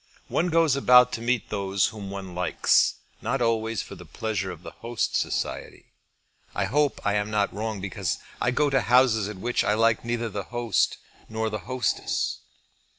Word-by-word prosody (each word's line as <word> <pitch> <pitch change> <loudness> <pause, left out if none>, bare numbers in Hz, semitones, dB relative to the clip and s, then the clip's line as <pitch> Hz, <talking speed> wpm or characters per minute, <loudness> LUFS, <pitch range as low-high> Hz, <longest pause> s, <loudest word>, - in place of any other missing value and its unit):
One 175 +2 +1
goes 165 -4 +3
about 125 -2 +6
to 115 - -4
meet 120 -1 0
those 100 -2 0
whom 105 -3 -8
one 95 -2 -7
likes, 90 0 +2 0.3
not 135 - -1
always 115 -3 0
for - - -10
the - - -10
pleasure 105 -4 -3
of 90 -1 -9
the - - -8
host's 115 -1 -2
society. - - -4 0.6
I 100 - +1
hope 145 +7 +1
I 105 - +2
am 105 0 0
not 105 -1 0
wrong 110 0 -3
because 95 -2 -2 0.2
I 120 - +2
go 145 +4 +1
to 135 -1 +3
houses 120 -4 +3
at 105 - -7
which 120 +6 0
I 105 - +2
like 115 0 +2
neither 120 0 -2
the 100 -1 -5
host 120 -3 0 0.3
nor 110 0 -2
the 105 - -3
hostess." 130 -5 -1
110 Hz, 180 wpm, -26 LUFS, 100-120 Hz, 0.6 s, about